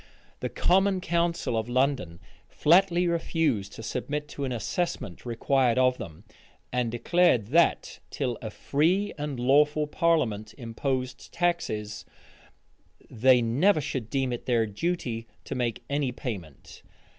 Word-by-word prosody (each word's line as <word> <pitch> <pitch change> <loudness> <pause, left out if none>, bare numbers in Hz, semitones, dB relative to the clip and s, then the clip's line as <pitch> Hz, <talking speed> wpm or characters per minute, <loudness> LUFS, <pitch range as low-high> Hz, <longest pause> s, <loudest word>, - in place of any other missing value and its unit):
The - - -3
common 190 +1 +2
council 170 -7 0
of 110 +1 -2
London 125 -10 0 0.3
flatly 175 +2 +3
refused 160 - 0
to 115 - -9
submit 145 +6 -3
to 140 -1 -4
an 130 - -3
assessment 120 - -3
required 120 +1 +1
of 130 0 +3
them; 85 +2 -9 0.5
and 125 -2 +1
declared 120 - +2
that, 165 +4 +2
till 125 -4 -2
a 110 - -5
free 170 - 0
and 145 -3 -4
lawful 150 +4 +3
parliament 125 -10 0
imposed 130 +1 -4
taxes, 110 - -2 1.1
they 125 +1 +4
never 155 - +3
should 130 -5 -4
deem 130 -1 0
it 120 - -7
their 120 -3 +3
duty 115 - -3 0.2
to - - -5
make 120 -3 -2
any 140 -2 0
payment. 90 - -8
130 Hz, 130 wpm, -27 LUFS, 115-165 Hz, 1.1 s, they